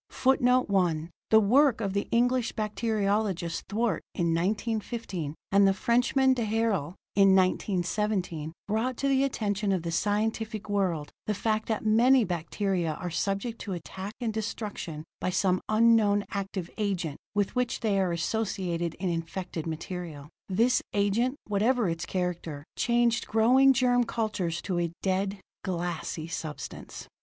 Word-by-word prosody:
[Footnote 255 -1 +3
1: 175 -4 +1 0.2
The 220 - +7
work 245 +4 +4
of 200 -4 -2
the 200 - -1
English 245 0 +2
bacteriologist 210 -5 -1
Twort, 225 +1 0 0.2
in 170 -2 +1
1915, 200 -3 -2 0.2
and 200 0 +6
the 195 - +3
Frenchman, 250 +5 +3
d'Herelle, 220 - 0 0.2
in 195 -1 +6
1917, 185 -3 0 0.2
brought 230 +4 -1
to 275 - 0
the 270 0 +3
attention 210 -6 -1
of 185 -3 0
the 170 - -3
scientific 215 +3 -1
world 185 -7 -1 0.2
the 210 - 0
fact 215 +2 -1
that 220 -1 -2
many 240 +4 +5
bacteria 175 -1 -1
are 180 -1 -5
subject 200 +7 -2
to 195 - -4
attack 190 +4 -6
and 230 -3 -2
destruction 205 -7 -4 0.2
by - - -1
some 185 0 +1
unknown 215 -2 +4
active 195 -3 -4
agent 180 -8 -2 0.2
with 205 +2 0
which 250 -1 0
they 205 -4 +1
are 185 -2 +1
associated 175 -2 -2
in 185 - -3
infected 170 0 -3
material. 160 -2 -6 0.2
This 230 +7 +3
agent, 205 +6 +1
whatever 215 +2 +2
its 165 0 -3
character, 170 -5 -3
changed 240 -1 +2
growing 250 +5 +5
germ 245 -2 +3
cultures 205 -8 -2
to 180 -3 -1
a 170 -1 -1
dead, 195 +1 0 0.2
glassy 170 -3 -3
substance. 160 -2 -7
200 Hz, 140 wpm, -28 LUFS, 175-225 Hz, 0.2 s, The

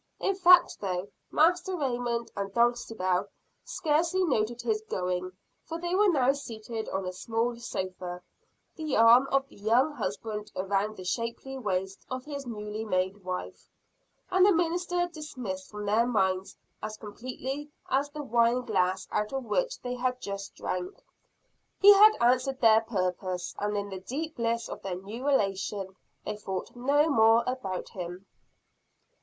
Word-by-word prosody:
In 395 - +1
fact 360 -1 +6
though, 185 -1 -3 0.2
Master 355 +4 +2
Raymond 240 -4 -1
and 200 0 -3
Dulcibel 225 -6 +1 0.4
scarcely 335 +4 +1
noted 240 -6 0
his 430 -1 0
going, 180 0 -2 0.3
for 330 - -5
they 350 +1 -3
were 405 +2 +5
now 270 -5 +3
seated 225 -4 -6
on 190 0 -2
a 185 - -4
small 230 +5 -1
sofa, 185 -5 -5 0.5
the 310 -3 -1
arm 235 +4 +7
of 275 0 +2
the - - -18
young 235 +8 +3
husband 210 - -4
around 200 +3 -1
the 185 - -7
shapely 230 +6 -3
waist 190 -5 -3
of 255 0 -5
his 280 -3 -6
newly 210 -1 -5
made 190 -1 -1
wife, 180 0 -6 0.6
and 370 0 +5
the 405 - +7
minister 350 +1 +1
dismissed 255 - -6
from 210 0 -6
their 220 +4 +3
minds 190 -5 0 0.2
as 215 0 -5
completely 255 +7 -6 0.2
as 280 +2 +1
the 295 0 -6
wine 235 0 +3
glass 190 -4 0
out 210 0 -1
of 270 -1 -2
which - - -1
they 245 - -3
had 250 0 -1
just 200 -2 -6
drank. 180 0 -4 0.8
He 410 +1 +10
had 425 +2 +7
answered 255 +2 +2
their 225 -1 +6
purpose 185 -4 -2
and 205 0 -1
in 200 0 -3
the 190 -1 -6
deep 295 - -5
bliss 230 0 0
of - - -7
their 190 -2 -3
new 220 +8 -6
relation, 195 -6 0 0.3
they 210 - -3
thought 190 0 -5
no 285 +5 +3
more 225 -4 +5
about 245 -8 -3
him. 180 +1 -7
230 Hz, 155 wpm, -29 LUFS, 195-275 Hz, 0.8 s, He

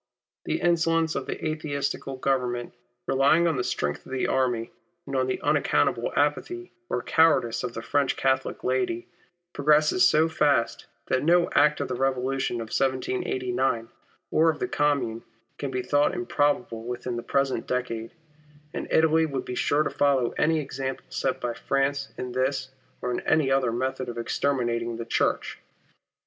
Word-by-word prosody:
The - - -1
insolence 165 -1 +2
of 140 - -4
the - - -4
Atheistical 145 -3 -2
Government, 125 -2 -1 0.3
relying 140 +5 +4
on 165 - +1
the 125 - 0
strength 75 -9 -2
of - - -13
the 130 -1 -1
army 125 -3 0 0.3
and 135 - -5
on 130 -1 +1
the 130 - -1
unaccountable - - +1
apathy 360 0 -1 0.2
or - - -1
cowardice 150 -8 +3
of 120 -1 -4
the 115 - -5
French 140 0 +1
Catholic 130 0 0
laity, 125 -2 -1 0.5
progresses 150 +5 +3
so 155 +1 +4
fast, 145 -7 +1 0.2
that 130 - +1
no 175 +2 +3
act 150 +1 +4
of 140 - -2
the - - -3
Eevolution 130 -1 0
of 110 - -12 0.6
'89 125 -2 -1 0.4
or 160 +1 +4
of 155 - 0
the - - -2
Commune, 135 -6 0 0.4
can 140 - -3
be 130 -1 -2
thought 145 +6 +2
improbable 145 -9 0
within 120 +1 -4
the 120 - -3
present 135 -1 0
decade; 115 -3 -2 0.6
and - - -4
Italy 160 0 +4
would 135 -3 -4
be - - -5
sure 145 +4 +2
to - - -2
follow 135 -4 +2
any 160 +1 +1
example 135 -2 -4
set - - -1
by 120 -1 -2
France 140 +2 -1
in 125 -1 -4
this 130 +1 -1 0.3
or 125 - -1
in 120 - -1
any 155 -4 +2
other 135 -3 +2
method 130 +1 -2
of 120 - -6
exterminating 120 -2 -1
the 115 - -5
Church. - - 0
135 Hz, 160 wpm, -26 LUFS, 125-150 Hz, 0.6 s, relying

